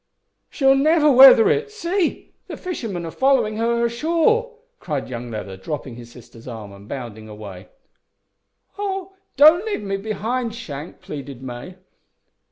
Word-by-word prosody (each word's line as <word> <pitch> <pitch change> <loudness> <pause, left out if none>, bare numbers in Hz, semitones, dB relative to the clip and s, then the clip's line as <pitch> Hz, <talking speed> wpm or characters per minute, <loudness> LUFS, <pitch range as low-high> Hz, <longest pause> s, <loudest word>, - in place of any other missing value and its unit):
"She'll 270 -2 +3
never 300 +2 +4
weather 255 -3 +9
it. 440 0 +1
See! 390 -4 -2
the - - -7
fishermen 225 - -5
are 165 - -6
following 265 -4 +2
her 230 +1 +1
along 235 0 +1
shore," 340 - +1 0.2
cried 145 -5 -4
young 120 -1 -6
Leather, 105 -4 -6
dropping 140 +4 -6
his 120 0 -12
sister's 120 -1 -15
arm, 110 -4 -8
and 100 +1 -14
bounding 110 -5 -7
away. 100 -3 -10 1.1
"Oh! 385 -2 -4 0.2
don't 310 +6 +7
leave 430 - -3
me 195 -1 -2
behind, 220 +3 -3
Shank," 155 - -8
pleaded 140 -3 -8
May. 125 +8 -8
215 Hz, 145 wpm, -21 LUFS, -, 1.1 s, weather